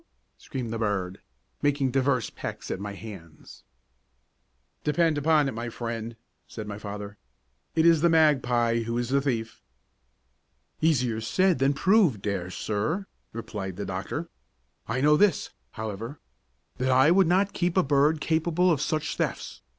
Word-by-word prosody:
screamed 120 -4 -6
the 115 - -3
bird, 100 -3 -2 0.4
making 140 -2 +1
divers 130 -3 +1
pecks - - -6
at - - -3
my 100 0 -5
hands. 95 -7 -11 1.2
"Depend 160 +1 +2
upon 150 0 +3
it, - - -1
my 115 +1 -5
friend," 115 -1 -5 0.3
said 110 - -7
my 105 0 -6
father, 105 0 -7 0.6
"it 160 0 +3
is 165 -2 +5
the 170 - +4
magpie 125 -7 +3
who 115 +1 -3
is 120 0 -2
the 140 +1 +2
thief." 115 -5 -3 1.2
"Easier 125 -8 +1
said 185 +8 +2
than 135 +1 +3
proved, 175 - +3
dear 95 -3 -2
sir," 110 - -2 0.3
replied 105 -5 -6
the 100 +2 -5
doctor. - - -4 0.6
"I 125 +4 -1
know 150 +2 +5
this, 200 -4 +2 0.2
however, 110 +5 -6 0.6
that 130 +1 0
I 130 +4 +5
would 190 0 +5
not 190 +3 +2
keep 175 0 -1
a 185 - +5
bird 145 +2 +3
capable 170 +3 +2
of 150 -4 +1
such 155 0 -2
thefts. - - -3
130 Hz, 150 wpm, -27 LUFS, 110-155 Hz, 1.2 s, is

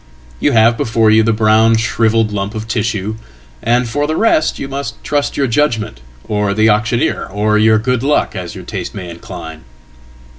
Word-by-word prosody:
Youhave 115 -4 +3
before 110 -1 +2
you 110 +1 +5
the 115 +1 +2
brown 110 +1 +3
shrivelled 115 -1 +1
lump 100 +1 -3
of 110 +1 -5
tissue, 110 -2 -2 0.4
and 120 +1 +1
for 145 +6 -1
the 155 - -1
rest 160 -8 +2
youmust 140 +1 -5
trust 145 -1 -1
your 140 - +2
judgment, 115 - -1 0.3
or 105 -1 -1
the 110 +1 +3
auctioneer, 115 +3 0
or 105 +2 0
your 110 0 +4
good 125 +2 -1
luck, 145 -3 0
as 90 -2 -6
yourtaste 95 0 -6
may 90 -3 -7
incline. 80 -1 -9
110 Hz, 160 wpm, -15 LUFS, 105-120 Hz, 0.4 s, you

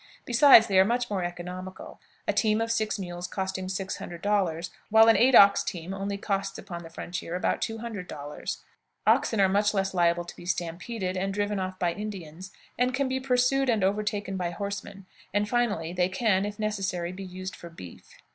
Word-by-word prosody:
Besides, 245 -1 +8
they 195 -3 +3
are - - +8
much 240 +3 -1
more 190 -3 -1
economical, 180 +2 -7 0.3
a - - +2
team 215 -1 +2
of 225 0 -1
six 220 -1 0
mules 175 -2 -5
costing 190 0 -3
six 190 0 -3
hundred 170 0 -8
dollars, 180 -5 0 0.2
while 220 +1 +7
an 225 - +7
eight 255 +1 +5
ox 200 -2 +8
team 175 -1 -5
only 200 +1 -3
costs 195 -1 -2
upon 175 -3 -7
the 165 - -10
frontier 175 +1 -5
about 180 - 0
two 225 - -2
hundred 220 -5 -6
dollars. 145 +1 -6 0.4
Oxen 220 - +3
are 195 - +6
much 205 +2 +2
less 195 0 0
liable 175 -1 +2
to 175 - -10
be - - -12
stampeded 185 +3 -3
and 190 +1 -1
driven 205 -1 -1
off 185 0 -4
by 175 -2 0
Indians, 185 -3 -7 0.3
and 250 +1 +2
can 275 0 0
be 260 0 -1
pursued 260 +1 +2
and 220 -5 +2
overtaken 205 0 -1
by 180 -2 -1
horsemen; 200 +1 -6 0.3
and, 205 0 +2
finally, 210 -8 0
they 180 0 +1
can, 195 0 +1
if 205 0 -7
necessary, 195 -5 -2
be 190 +1 -8
used 185 0 -7
for 170 - -10
beef. 95 - -12
195 Hz, 195 wpm, -27 LUFS, 180-215 Hz, 0.4 s, Besides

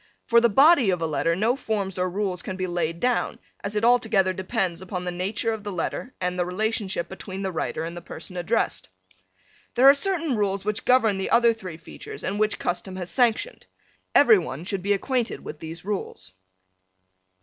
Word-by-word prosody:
For 235 0 +5
the 235 - +4
body 275 - +6
of 180 -2 +1
a 165 - -1
letter 155 +2 0
no 220 +7 +2
forms 200 -8 -3
or 185 0 +1
rules 185 -1 -2
can 185 - -6
be 185 - -1
laid 170 -2 -2
down 250 +3 0 0.3
as 200 +1 -4
it 210 +2 +1
altogether 220 -6 +3
depends 185 -2 -2
on 180 -1 -5
the 180 - -2
nature 195 +6 -1
of 215 -2 -6
the 205 - -4
letter 190 +7 -4
and 180 0 -2
the - - +3
relationship 195 0 -1
between 190 0 -7
the 190 - -1
writer 160 -1 -3
and 170 +1 -5
the 175 - -7
person 180 +2 -9
addressed. 180 - -1 0.9
There 260 +2 +6
are 275 - +10
certain 330 -2 0
rules 200 -2 -1
which 210 +1 -2
govern 225 -6 +4
the 190 - -2
other 235 -1 +5
three 185 -7 -8
features 165 - -10
and 200 +2 -2
which 215 0 +1
custom 185 +1 -3
has 180 -1 -5
sanctioned. 245 - 0 0.5
Every 440 -4 +7
one 140 - -6
should 195 -1 -2
be 200 +2 +2
acquainted 245 +4 -1
with 150 - -7
these 165 +2 -8
rules. 190 - -5
195 Hz, 195 wpm, -25 LUFS, 180-225 Hz, 0.9 s, are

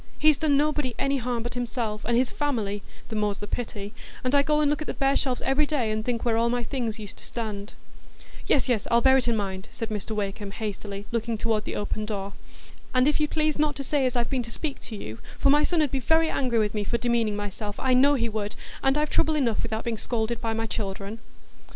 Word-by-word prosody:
He's 305 -2 +5
done 300 -3 +3
nobody 295 -4 +1
any 275 0 +1
harm 245 -2 -2
but 240 - -4
himself 235 -3 -2
and 235 0 +2
his 255 0 +2
family,—the 220 -5 -3
more's 210 -2 0
the 205 - -5
pity,—and 225 +3 -5
I 285 - +7
go 300 +1 +2
and 300 - +3
look 295 +1 +1
at 305 - -4
the - - -3
bare 275 0 +2
shelves 255 -3 0
every 275 +3 +3
day, 255 -8 0
and 215 0 -1
think 235 0 -1
where 230 -2 +3
all 230 +1 +3
my 245 0 0
things 235 -3 -2
used 210 -3 -8
to - - -12
stand." 210 -3 -5 0.7
"Yes, 275 - +3
yes, 235 -5 +1
I'll 235 0 +5
bear 265 +1 +6
it 255 - +1
in 235 - +3
mind," 190 -2 -3
said 225 - -5
Mr 215 +1 -3
Wakem, 205 0 -3
hastily, 205 -2 -5
looking 230 -1 -1
toward 220 -1 0
the - - -4
open 210 +1 -2
door. 200 -2 -3 0.6
"And 255 +1 +5
if 300 - +2
you'd 300 -1 +2
please 310 -1 +1
not 300 -1 +2
to 275 - -4
say 275 -1 +2
as 250 - -2
I've 240 -1 +1
been 260 -2 +1
to 235 - -7
speak 285 +4 -4
to 225 - -7
you, 110 - -7 0.2
for 275 - +4
my 295 +1 +5
son 330 -2 +3
'ud 290 - -1
be 270 - 0
very 320 +5 +3
angry 250 -4 +1
with 210 -2 +2
me 210 -1 -1
for 235 +4 0
demeaning 235 -2 +1
myself, 205 0 -4
I 260 -1 +2
know 280 +3 +6
he 235 -3 +1
would, 210 -2 -3 0.3
and 270 +2 +3
I've 300 0 0
trouble 315 0 +3
enough 240 -7 +1
without 220 -1 -2
being 230 -2 -2
scolded 230 0 -1
by 225 -1 0
my 225 0 -1
children." 205 0 -4
235 Hz, 245 wpm, -26 LUFS, 215-275 Hz, 0.7 s, I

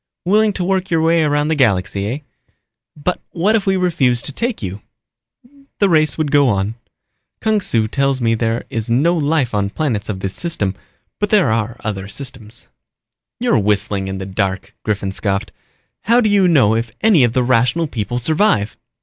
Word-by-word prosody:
"Willing 210 +3 +3
to 185 - -3
work 190 +1 0
your 165 -2 +1
way 165 0 +3
around 145 0 +1
the - - +2
galaxy, 100 -6 +1
eh? 120 +6 -2 0.8
But 165 +5 -2
what 195 +6 +2
if 205 -3 0
we 190 0 +3
refused 135 -10 +1
to - - -1
take 235 - -3
you?" 95 +2 -5 1.0
"The 200 - +3
race 155 -4 +2
would 155 -3 -1
go 145 -2 +4
on. 100 0 0 0.7
Kung 220 -1 +1
Su 115 -10 0
tells 135 +2 0
me 115 -2 +1
there 115 +1 -1
is 115 -1 -3
no 145 +9 +3
life 145 -5 0
on 100 -1 0
planets 115 -5 -2
of 95 -3 -4
this 95 -1 -3
system, 130 - -1 0.5
but 205 - 0
there 200 - +3
are 115 +1 -1
other 100 -3 -4
systems." 120 0 -6 0.7
"You're 245 - +2
whistling 100 -1 0
in 95 0 -4
the 95 - -5
dark," 95 0 -3
Griffin 100 -2 -2
scoffed. 100 0 -2 0.5
"How 235 +2 +4
do 220 -3 +2
you 200 -2 +4
know 135 -11 +4
if 115 0 -2
any 210 -11 +5
of 120 -2 +2
the 125 - +2
Rational 125 +6 +2
People 120 -4 -3
survive?" 155 - +1
125 Hz, 185 wpm, -18 LUFS, 105-170 Hz, 1.0 s, any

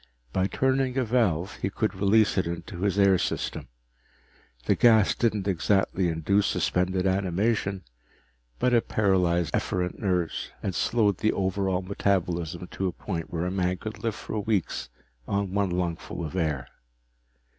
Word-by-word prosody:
By 95 0 +2
turning 130 +2 0
a 130 - +3
valve, 100 -7 +1
he 95 - -2
could 110 +2 -1
release 105 +3 +3
it 95 - +1
into 85 +1 -6
his 100 0 +1
air 100 -2 +5
system. - - -3 1.0
The - - +4
gas 110 -4 +5
didn't 105 -4 0
exactly 95 0 +1
induce 90 +5 +1
suspended 90 +1 0
animation, 95 +1 0 0.7
but 125 - +1
it 120 - +3
paralyzed 90 -5 +2
efferent 90 -1 -1
nerves 90 -5 -1
and 95 - -1
slowed 105 -4 +1
the 110 +1 +2
overall 95 -1 0
metabolism 90 -3 -1
to 95 - -2
a - - -1
point 85 -3 -5
where 85 0 -2
a 90 - -1
man 90 -1 0
could 110 +3 -7
live 115 -2 -1
for 110 - -4
weeks 105 - -1 0.4
on 100 -1 -1
one 100 -1 +1
lungful 85 -1 -3
of 75 - -7
air. 75 -8 -1
95 Hz, 150 wpm, -27 LUFS, 90-105 Hz, 1.0 s, air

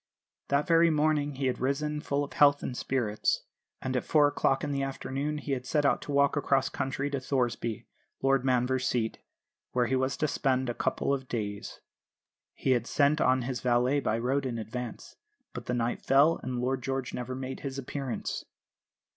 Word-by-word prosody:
That 140 +1 +2
very 165 -1 +5
morning 150 -2 +1
he 135 +1 -2
had 130 - 0
risen 150 +3 -1
full 140 -1 0
of 140 - -7
health 145 -1 +5
and 125 - -3
spirits, 120 -5 0 0.4
and 130 0 -2
at 125 - +1
four 150 -2 +4
o'clock 140 -2 +1
in 145 - -1
the 140 -1 -1
afternoon 135 +2 -3
had 135 -4 -3
set 150 -2 +1
out 140 - +3
to - - -6
walk 140 0 +3
across 135 -2 +2
country 135 +2 -2
to 140 - -1
Thoresby, 120 -4 -1 0.3
Lord 135 -1 +2
Manvers' 130 0 +1
seat, 115 -2 -1 0.5
where 125 -1 +3
he 130 +3 +1
was 130 +1 0
to 155 - +1
spend 130 -3 0
a - - -5
couple 140 - 0
of 135 -1 -3
days. 105 -4 -4 0.7
He 130 - 0
had 120 -2 +2
sent 150 +1 +3
on 130 0 +3
his 125 0 -3
valet 125 +3 +2
by 115 -5 0
road 130 +3 0
in 120 -2 -3
advance; 115 +2 -6 0.4
but - - -7
the 125 - 0
night 120 0 -1
fell, 145 +5 +4
and 125 -1 -3
Lord 130 +1 0
George 135 0 -3
never 125 +1 -4
made 130 0 -5
his 135 -1 -5
appearance. 135 -1 -4
135 Hz, 190 wpm, -29 LUFS, 125-140 Hz, 0.7 s, very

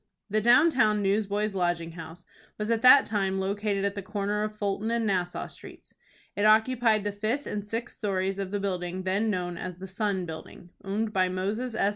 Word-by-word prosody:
The 215 +1 +2
down 250 +9 +6
town 215 -6 +2
Newsboys' 205 +1 0
Lodging 175 -3 -1
House 165 +1 -10 0.3
was 210 +2 -2
at 225 -1 +1
that 255 +2 +8
time 195 -3 -1
located 200 +1 -1
at 200 - 0
the 200 - -5
corner 205 +1 -2
of 215 0 -3
Fulton 205 +1 -2
and 235 -1 0
Nassau 180 -3 -1
Streets. - - -12 0.4
It 205 - -1
occupied 220 0 +4
the 205 - -1
fifth 215 +8 -2
and 205 -1 -3
sixth 225 +3 -5
stories 195 -1 -1
of 195 -1 -3
the 205 +1 -2
building 185 -2 -3
then 195 +4 0
known 180 -3 -2
as 180 -1 -5
the 185 +2 -9
"Sun" 190 -1 -2
building, 165 +2 -10
owned 215 +3 -2
by 185 -1 +2
Moses 210 +6 -2
S. 200 - +2
205 Hz, 195 wpm, -27 LUFS, 185-215 Hz, 0.4 s, that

